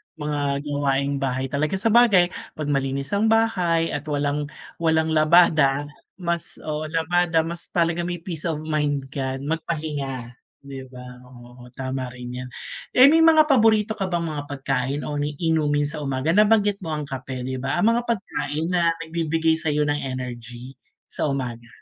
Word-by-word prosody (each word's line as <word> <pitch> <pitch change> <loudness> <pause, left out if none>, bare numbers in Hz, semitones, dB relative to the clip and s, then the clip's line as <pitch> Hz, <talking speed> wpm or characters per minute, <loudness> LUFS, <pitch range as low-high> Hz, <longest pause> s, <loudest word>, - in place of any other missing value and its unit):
Mga 145 -2 -2
gawaing 140 -1 0
bahay 130 -1 -2
talaga. 150 +5 0
Sabagay, 210 -4 +4 0.2
‘pag 150 -1 -3
malinis 135 0 -1
ang 205 +2 +2
bahay 180 -7 +2
at 145 +1 -4
walang 145 0 -1 0.3
walang 160 -1 +2
labada, 155 -3 +4 0.3
mas 170 -2 -3
oo, 155 0 -3
labada, 165 +1 +1
mas 170 +1 -5
talaga 170 0 +1
may 175 -2 -5
peace 170 -3 -4
of 155 -2 -3
mind 150 -3 0
ka 135 -2 -3
magpahinga, 145 -5 -3 0.3
‘di 135 -1 -8
ba. 125 -1 -11 0.2
Oo, 120 0 -14
tama 130 -1 -3
rin 125 0 -7
‘yan. 125 0 -7 0.5
Eh, 260 +3 +8
may 325 - +5
mga 315 -2 +6
paborito 220 -3 +3
ka 195 - 0
bang 175 -2 -1
mga 150 -3 -4
pagkain 135 0 -2
o 145 -1 -3
inumin 150 0 0
sa 150 +1 -4
umaga? 135 +1 -1
Nabanggit 205 +1 +4
mo 160 -4 -4
ang 150 - -3
kape, 130 -2 -6
‘di 130 0 -4
ba. 135 +1 -2
Ang 210 +6 +3
mga 240 +1 -1
pagkain 165 -7 -2
na 170 -2 +2
nagbibigay 160 0 0
sa’yo 150 -2 0
ng 145 0 0
energy 125 -1 -7 0.4
sa - - -1
umaga. 120 -4 -4
150 Hz, 160 wpm, -23 LUFS, 135-170 Hz, 0.5 s, Eh